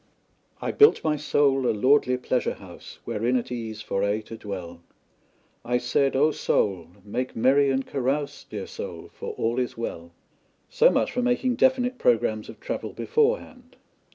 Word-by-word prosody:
"I - - -1
built 430 0 +5
my 155 -1 +1
soul 140 -3 +2
a - - +2
lordly 125 +3 +3
pleasure 125 0 -1
house 90 -3 -12
Wherein 120 +4 0
at 125 - -4
ease 110 -3 -5
for 100 - -1
aye 100 +2 0
to 115 - -10
dwell, 90 -6 -7 0.8
I 125 +1 +1
said: 135 +3 +1
Oh, 150 +4 +4
soul, 95 - 0 0.2
make 125 +5 -4
merry 135 +4 +4
and 135 0 0
carouse, 140 +2 -2
Dear - - -5
soul, - - -8
for - - -6
all 115 +2 -1
is 125 -2 -3
well." 85 -7 -5 0.6
So - - +5
much - - +1
for 250 - -1
making 250 0 +1
definite 255 -1 +2
programmes 110 -2 +1
of - - -11
travel - - -5
beforehand. 460 +2 -1
125 Hz, 160 wpm, -25 LUFS, 110-145 Hz, 0.8 s, built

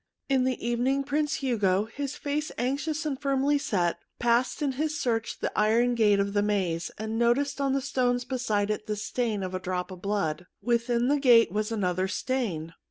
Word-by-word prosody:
In 265 -2 +3
the 255 -3 -1
evening 255 +4 +1
Prince 290 0 -1
Hugo, 205 -5 +2
his 275 +5 -5
face 295 +1 -2
anxious 295 +5 -1
and 275 -3 -3
firmly 275 +1 +2
set, 175 -10 0 0.2
passed 240 +5 +1
in 280 - +1
his 305 +4 -2
search 230 -2 -1
the - - -2
iron 230 +3 +3
gate 210 -4 +3
of 200 0 0
the 205 - +2
maze, 185 -5 0
and 220 +1 -3
noticed 270 +5 +2
on 275 -1 +1
the 275 - +1
stones 250 -3 0
beside 215 -5 0
it 210 0 -4
the 210 - -1
stain 215 -1 -2
of 185 0 -4
a 185 - -2
drop 180 0 -3
of 185 -1 -9
blood. 180 -4 -1
Within 240 0 +1
the 290 +1 +2
gate 240 -6 +6
was 215 +2 -1
another 185 -3 0
stain. 190 -9 -2
235 Hz, 190 wpm, -27 LUFS, 205-270 Hz, 0.2 s, gate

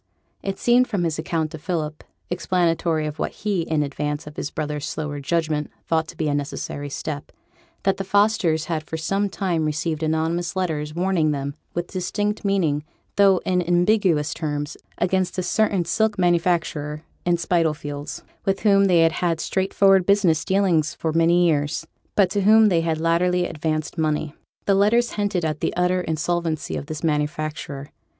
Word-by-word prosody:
It 195 0 -3
seemed 245 +1 +4
from 200 -7 -1
his 160 -2 -1
account 160 -1 -1
to 160 - -7
Philip 155 -2 -3 0.3
(explanatory 170 -3 +1
of 150 0 -5
what - - -1
he, 205 -4 -1
in 160 -2 0
advance 145 +1 -3
of 150 0 -10
his - - -3
brother's 150 -1 -4
slower 150 -2 -4
judgment, 155 0 -1 0.2
thought 160 -1 +1
to 170 - -11
be 155 - -1
a 145 - +1
necessary 145 0 -4
step), 145 +1 -5 0.5
that 195 - +2
the 195 - -2
Fosters 195 -5 +2
had 160 -2 -2
for 160 +1 -6
some 195 +5 0
time 180 -4 -1
received 155 +1 -1
anonymous 160 +3 0
letters, 155 -5 -2
warning 175 -3 +1
them, 140 -1 -2 0.2
with 175 0 -1
distinct 205 +4 -2
meaning, 170 -8 +1 0.3
though 195 -2 +5
in 180 -1 +2
ambiguous 175 -2 +2
terms, 145 -2 -3 0.2
against 185 0 0
a 185 - 0
certain 195 -1 +1
silk 210 +5 +1
manufacturer 170 -4 0 0.2
in 175 -1 +2
Spitalfields, 150 -4 -1 0.2
with 195 -1 0
whom 200 -2 +5
they 175 -3 +4
had 165 0 +5
had 165 -1 -1
straightforward 190 0 +3
business 195 -6 +3
dealings 190 -6 +2
for 160 -1 -2
many 170 +2 +4
years; 145 -3 0 0.3
but 190 -3 +4
to 205 - +1
whom 215 +2 +6
they 170 -3 +3
had 165 -1 0
latterly 175 +2 +2
advanced 155 +1 -3
money. 155 -1 0 0.3
The 200 - +3
letters 215 +5 +3
hinted 200 -5 -1
at 155 -1 -2
the - - -1
utter 180 +1 +2
insolvency 165 -1 -1
of 140 - -5
this 155 +1 -6
manufacturer. 150 -2 -2
165 Hz, 170 wpm, -23 LUFS, 155-190 Hz, 0.5 s, whom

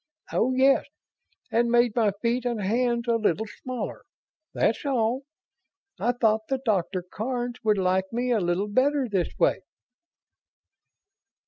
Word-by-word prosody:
Oh, 255 - +2
yes, 270 +1 +4 0.7
and 235 +1 +2
made 240 -1 +3
my 225 -3 +3
feet 235 +1 +1
and 240 -3 -1
hands 235 +4 0
a 230 -1 +3
little 215 -1 0 0.2
smaller. 255 -2 -5 0.5
That's 225 - 0
all. 260 -1 0 0.7
I 240 - +2
thought 220 -2 +1
the 270 - +1
Doctor 200 -7 -1
Karns 240 +6 -4
would 215 -2 +3
like 190 0 +1
me 245 +2 -1
a 230 - +3
little 175 +2 0
better 265 +5 +2
this 195 -5 -2
way." - - +2
235 Hz, 135 wpm, -26 LUFS, 210-250 Hz, 0.7 s, yes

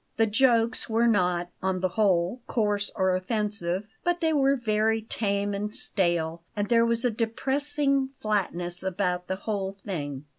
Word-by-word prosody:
The 225 - +4
jokes 235 +1 +2
were 225 +1 +2
not, 180 -5 +2
on 190 -1 0
the 185 - +1
whole, 190 +2 +1
coarse 205 -3 0
or 190 -1 +2
offensive; 195 -2 -1 0.2
but 350 0 +1
they 320 -1 +1
were 275 -1 +3
very 220 -2 +1
tame 205 -2 -1
and 205 +1 -3
stale, 170 -3 0
and 205 0 -1
there 230 -1 +4
was 235 +1 +1
a 245 - +3
depressing 275 +4 0
flatness 180 -4 -1
about 180 -1 -1
the 190 - -1
whole 195 -1 -3
thing. 150 -8 -5
205 Hz, 155 wpm, -27 LUFS, 185-230 Hz, 0.2 s, The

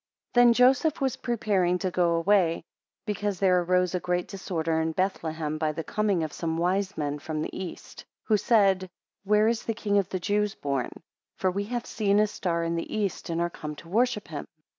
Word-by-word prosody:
THEN 245 -1 +7
Joseph 260 +5 +4
was 265 -3 0
preparing 200 -7 +1
to 185 0 -2
go 170 -1 +2
away, 170 -1 +2 0.4
because 205 -2 -2
there 185 -2 +4
arose 180 +1 +1
a 180 - 0
great 180 0 -1
disorder 165 -5 -2
in 160 0 -1
Bethlehem 160 -4 -2
by 155 -1 0
the 165 - -4
coming 205 -4 0
of 155 - -4
some 165 -1 -2
wise 190 +3 0
men 145 -1 -2
from 155 +1 -4
the - - -6
east, 185 -2 -7
2 - - -11 0.2
Who 215 - +5
said, 195 -4 +3 0.4
Where 210 +2 +4
is 230 0 +1
the 225 - -1
King 205 -2 +1
of 195 -1 -2
the 185 - -2
Jews 205 +2 0
born? 140 -3 -2 0.5
For 185 - 0
we 200 +2 -2
have 240 +2 -3
seen 205 -2 +1
his 210 0 +3
star 170 -4 -1
in 165 0 -1
the 165 - -4
east, 200 -4 -2
and 165 0 -1
are 170 0 0
come 150 -2 -6
to 165 - -13
worship 225 +1 +1
him. 150 -3 -6
185 Hz, 205 wpm, -27 LUFS, 165-210 Hz, 0.5 s, THEN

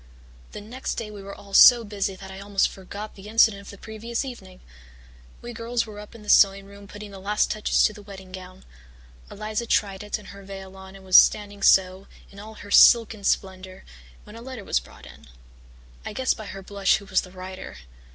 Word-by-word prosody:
"The - - -8
next 245 +6 -6
day 215 -2 -6
we 205 -1 -10
were 200 0 -9
all 200 -1 -15
so 240 +3 +8
busy 200 -2 -3
that 190 0 -11
I 190 - -9
almost 200 0 0
forgot 200 +3 -9
the 195 +1 -13
incident 220 -2 +3
of 200 - -13
the 200 - -11
previous 230 +5 -5
evening. 190 -8 -10 0.8
We 240 0 -7
girls 230 +1 -2
were 210 -2 -10
up 210 +2 -12
in 220 - -13
the - - -15
sewing 195 -1 +5
room 200 0 -14
putting 205 0 -10
the 195 - -10
last 205 +2 0
touches 215 0 +1
to 215 - +2
the 210 - -12
wedding 195 -2 -12
gown. 185 0 -11 0.6
Eliza 215 +2 -4
tried 195 -4 0
it 210 0 -4
and 210 -2 -14
her 200 - -12
veil 195 -1 -10
on 190 0 -12
and 190 -1 -14
was 185 -1 +7
standing 205 -1 +3
so, 190 0 +3 0.2
in 200 - -13
all 220 +2 -11
her 205 -1 -12
silken 225 -2 +6
splendour, 190 -1 -2 0.4
when 210 - -14
a 230 - -10
letter 250 -3 -8
was - - 0
brought - - -16
in. - - -15 0.8
I - - -7
guessed 260 +3 0
by 215 -3 -9
her 195 -1 -9
blush 200 0 +1
who 200 - -12
was 190 -1 +1
the 185 - -12
writer. 185 - -9
200 Hz, 215 wpm, -24 LUFS, 195-215 Hz, 0.8 s, so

